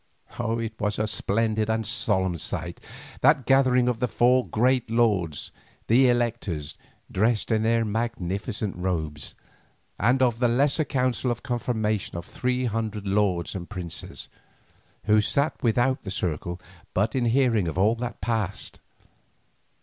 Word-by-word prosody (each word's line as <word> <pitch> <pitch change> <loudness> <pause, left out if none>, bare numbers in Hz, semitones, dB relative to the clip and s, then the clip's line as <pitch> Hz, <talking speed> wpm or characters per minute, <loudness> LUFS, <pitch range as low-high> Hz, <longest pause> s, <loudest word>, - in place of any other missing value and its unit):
It 115 -1 -1
was 105 0 -1
a 110 - +1
splendid 110 0 0
and 110 0 +1
a - - -8
solemn 95 -6 0
sight, - - -4 0.4
that 150 -5 +4
gathering 130 -2 +4
of 125 -2 0
the 125 - +1
four 125 +2 +3
great 125 +1 +1
lords, 105 -9 +1 0.3
the 125 +3 +5
electors, 115 -11 -1 0.4
dressed 110 +3 +1
in 110 -1 +3
their 115 +1 +2
magnificent 105 -2 -2
robes, 80 -5 -3 0.6
and 125 +5 +3
of 120 -2 +2
the 125 - +3
lesser 140 +6 +2
council 130 -2 0
of 120 0 -3
confirmation 110 -7 -1
of 85 - -6
three 125 0 -1
hundred 110 -3 -2
lords 95 -4 +1
and 90 -3 -6
princes, 90 -5 -6 0.8
who 105 0 +4
sat 140 +8 0
without 120 +3 +2
the 100 - -7
circle 90 -1 -3 0.4
but 105 +4 +1
in 130 -2 +1
hearing 115 -5 +2
of 80 - -4
all 105 +4 +4
that 120 -1 -5
passed. 110 -2 -2
110 Hz, 140 wpm, -25 LUFS, 100-125 Hz, 0.8 s, the